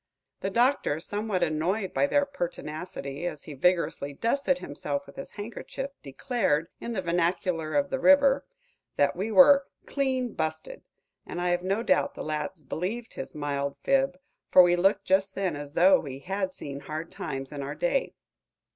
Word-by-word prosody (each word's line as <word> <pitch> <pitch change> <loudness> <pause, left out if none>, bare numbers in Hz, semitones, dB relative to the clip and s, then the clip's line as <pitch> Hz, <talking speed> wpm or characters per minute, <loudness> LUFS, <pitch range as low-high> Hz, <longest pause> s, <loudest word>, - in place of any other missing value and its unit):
The 195 - -2
Doctor, 235 - +2
somewhat 205 +1 -2
annoyed 175 +5 -1
by 280 - +2
their 285 0 +3
pertinacity 160 - -5
as 155 -4 -6
he 155 - -8
vigorously 155 -2 +1
dusted 275 - +1
himself 280 +1 -4
with - - -14
his 275 - -8
handkerchief, 235 +6 -6
declared, 165 - -1
in 235 - -4
the 190 -4 -2
vernacular 170 -1 0
of 285 0 +1
the 270 - 0
river, 280 0 +5 0.5
that 140 0 +2
we 200 +5 -2
were 275 +3 +7 0.2
"clean 260 -4 -1
busted;" 160 0 -4 0.5
and 175 - -5
I 180 0 0
have 175 0 +1
no 195 +5 0
doubt - - +2
the - - -5
lads 155 +1 -4
believed 200 - -4
his 135 - -7
mild 140 -1 -2
fib, 275 0 +2 0.3
for 185 - +8
we 175 0 +4
looked 195 +3 +2
just 195 +1 +2
then 190 -5 -1
as 145 0 -7
though 280 - +6
we 135 -3 -6
had 190 +5 -3
seen 140 -6 -7
hard 155 +3 -6
times 135 0 -5
in 145 -1 -5
our 140 - -4
day. - - 0
185 Hz, 170 wpm, -27 LUFS, 155-250 Hz, 0.5 s, for